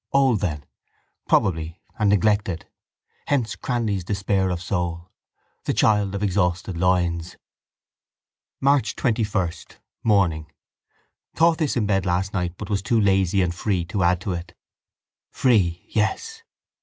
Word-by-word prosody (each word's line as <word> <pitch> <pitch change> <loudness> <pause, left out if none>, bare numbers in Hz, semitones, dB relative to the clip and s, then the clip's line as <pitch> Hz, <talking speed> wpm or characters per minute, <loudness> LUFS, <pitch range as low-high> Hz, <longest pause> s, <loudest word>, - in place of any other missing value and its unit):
Old 135 -5 +3
then. 75 -7 -3 0.6
Probably, 80 -2 +1 0.2
and 105 -2 +3
neglected. 100 -3 +1 0.6
Hence 130 -6 0
Cranly's 110 -7 -2
despair 95 0 0
of 90 -1 -2
soul: 85 -1 -3 0.5
the - - 0
child 105 -2 +2
of 100 - -3
exhausted 90 -2 0
loins. 85 -1 0 1.2
March 140 -3 +2
21, 110 -7 0 0.5
morning. 85 -8 +2 0.8
Thought 165 0 +3
this 150 -5 0
in 110 - +1
bed 95 -2 +1
last 90 +2 0
night 90 -2 -2
but - - -6
was 100 -1 +1
too 115 +3 +1
lazy 95 -2 +3
and 85 -1 -1
free 90 -1 -1
to 95 +3 -3
add 90 0 +3
to 95 - -3
it. 85 0 -7 0.7
Free, 95 -9 +1
yes. 450 - -1
95 Hz, 130 wpm, -23 LUFS, 90-105 Hz, 1.2 s, Old